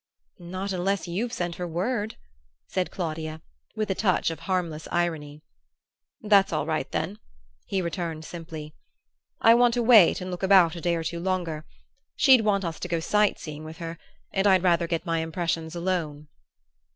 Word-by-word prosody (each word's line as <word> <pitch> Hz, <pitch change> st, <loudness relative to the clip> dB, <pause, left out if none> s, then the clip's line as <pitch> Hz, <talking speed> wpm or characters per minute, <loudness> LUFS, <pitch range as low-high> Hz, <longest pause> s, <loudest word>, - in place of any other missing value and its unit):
"Not 185 Hz, +3 st, -4 dB
unless 190 Hz, +1 st, -1 dB
you've 210 Hz, +8 st, -2 dB
sent 175 Hz, -7 st, -3 dB
her 180 Hz, -, -3 dB
word," 205 Hz, +6 st, -2 dB, 0.5 s
said 185 Hz, -, -2 dB
Claudia, 160 Hz, -3 st, -4 dB, 0.4 s
with 215 Hz, -2 st, -1 dB
a -, -, +3 dB
touch 185 Hz, -4 st, +1 dB
of 160 Hz, -, -7 dB
harmless 170 Hz, -4 st, -2 dB
irony. 155 Hz, -4 st, -2 dB, 0.8 s
"That's 200 Hz, -2 st, +4 dB
all 155 Hz, -2 st, -1 dB
right, 155 Hz, -1 st, -2 dB
then," 205 Hz, +3 st, -3 dB, 0.5 s
he 190 Hz, -2 st, -1 dB
returned 165 Hz, -2 st, -4 dB
simply. 160 Hz, -3 st, -8 dB, 0.7 s
"I 225 Hz, -, +7 dB
want 240 Hz, 0 st, +4 dB
to 240 Hz, -, +1 dB
wait 225 Hz, -7 st, +7 dB
and 185 Hz, 0 st, -5 dB
look 180 Hz, -, -5 dB
about 190 Hz, -4 st, +5 dB
a 170 Hz, -, -6 dB
day 170 Hz, 0 st, +1 dB
or 165 Hz, -, -2 dB
two 170 Hz, +1 st, -3 dB
longer. 170 Hz, -4 st, -2 dB, 0.5 s
She'd 260 Hz, -3 st, +6 dB
want 200 Hz, -3 st, +1 dB
us 165 Hz, -1 st, -4 dB
to -, -, -4 dB
go 170 Hz, -1 st, -1 dB
sight 210 Hz, +5 st, +2 dB
seeing 155 Hz, -1 st, -8 dB
with 160 Hz, +1 st, -9 dB
her; 165 Hz, 0 st, -6 dB, 0.3 s
and 195 Hz, +1 st, +2 dB
I'd 190 Hz, -2 st, +5 dB
rather 170 Hz, -2 st, +3 dB
get 165 Hz, +1 st, -2 dB
my 165 Hz, -2 st, 0 dB
impressions 165 Hz, 0 st, -2 dB
alone." 165 Hz, -5 st, -2 dB
175 Hz, 175 wpm, -26 LUFS, 160-195 Hz, 0.8 s, I